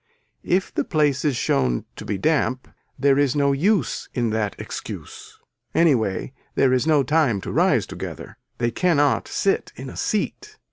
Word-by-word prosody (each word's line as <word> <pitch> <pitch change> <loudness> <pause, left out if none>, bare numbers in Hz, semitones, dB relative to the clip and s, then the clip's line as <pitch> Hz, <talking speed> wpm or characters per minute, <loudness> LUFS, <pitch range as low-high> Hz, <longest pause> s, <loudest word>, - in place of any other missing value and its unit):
If 185 +2 0
the - - 0
place 145 -4 +1
is 145 -4 +1
shown 60 - 0
to - - -9
be 105 - -2
damp 130 0 0 0.3
there 140 +1 +3
is 145 -1 +2
no 140 -1 +3
use 170 - 0
in 120 -3 0
that 105 -2 -1
excuse. - - -8 0.4
Anyway 125 - +2 0.2
there 130 -1 +3
is 130 +4 +1
no 150 -3 +4
time 145 -7 +2
to - - -5
rise - - +3
together. - - -8 0.2
They 120 -1 0
cannot 145 -5 +2
sit 195 - 0
in 130 0 -8
a - - -11
seat. 425 - -2
140 Hz, 160 wpm, -23 LUFS, 120-155 Hz, 0.4 s, no